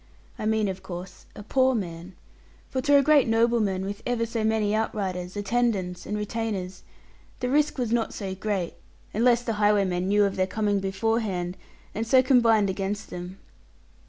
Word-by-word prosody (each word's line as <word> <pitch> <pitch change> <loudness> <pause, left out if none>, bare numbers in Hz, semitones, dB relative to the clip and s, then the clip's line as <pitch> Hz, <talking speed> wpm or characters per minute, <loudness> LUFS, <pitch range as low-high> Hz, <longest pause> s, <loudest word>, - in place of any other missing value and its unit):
I 215 - -2
mean, 220 -1 +2
of 190 -1 -4
course, 180 +1 -9
a 205 - -9
poor 260 +4 +2
man; 175 -3 -5 0.6
for 260 - -1
to 285 +2 +5
a 280 - +4
great 295 -2 +5
nobleman, 225 -4 +2
with 200 +2 -5
ever 240 -2 0
so 230 -1 -3
many 220 -1 +1
outriders, 190 -4 -2
attendants, 205 -4 -1
and 210 - -2
retainers, 210 -4 -3 0.6
the 250 0 -1
risk 295 +1 +2
was 245 -3 -1
not 235 -1 +1
so 195 -3 -5
great, 190 -2 -2 0.4
unless 240 +2 +3
the 230 - -1
highwaymen 195 -3 +2
knew 205 +1 +4
of 200 0 -2
their 185 0 +2
coming 205 0 0
beforehand, 195 -2 -1 0.4
and 220 +1 -3
so 260 +2 +5
combined 230 -5 +4
against 195 +1 -3
them. 180 +1 -7
210 Hz, 165 wpm, -26 LUFS, 190-230 Hz, 0.6 s, to